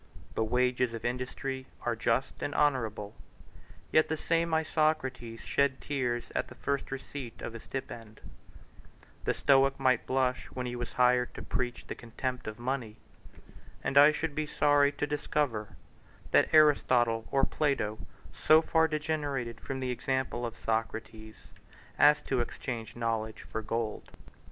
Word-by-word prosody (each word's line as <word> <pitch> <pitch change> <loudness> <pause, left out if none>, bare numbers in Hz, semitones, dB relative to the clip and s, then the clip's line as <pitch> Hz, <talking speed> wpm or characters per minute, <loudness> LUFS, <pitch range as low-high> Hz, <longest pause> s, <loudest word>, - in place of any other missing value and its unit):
The 110 - 0
wages 125 +1 +1
of 115 +1 -7
industry 130 +2 -3 0.2
are 120 -1 0
just 130 +4 -1
and 145 - -3
honorable, 110 -8 0 0.8
yet 155 - +5
the 160 - -1
same 165 +1 0
Isocrates 155 -7 0
shed 140 -2 +1
tears 125 -4 -2
at - - -1
the 125 - -12
first 140 +2 -2
receipt 135 -2 -7
of 115 - -5
a 115 - -7
stipend: 115 -4 -7 1.1
the - - +1
Stoic 135 -1 +4
might 130 -3 +2
blush 130 -1 +1
when 125 -1 -5
he 125 0 -4
was 120 -1 -5
hired 125 0 +3
to - - -7
preach 125 -1 -3
the - - -5
contempt 125 +1 -5
of 110 0 -5
money; 120 -3 -3 0.9
and 135 - -2
I 145 +1 +9
should 155 0 -3
be 155 +1 -2
sorry 145 -1 +4
to - - -1
discover 145 -7 -2 0.6
that - - +4
Aristotle 125 -7 +4
or 135 0 +2
Plato 135 -10 0 0.3
so 155 +1 +5
far 160 0 +3
degenerated 145 -6 -2
from 135 -1 -4
the 130 -1 -1
example 125 -1 -1
of 115 - -8
Socrates, 110 -1 -4 0.5
as 150 0 +6
to 130 - 0
exchange 120 -1 -5
knowledge 115 -2 -2
for 110 - -5
gold. 110 0 -3
125 Hz, 145 wpm, -30 LUFS, 115-140 Hz, 1.1 s, I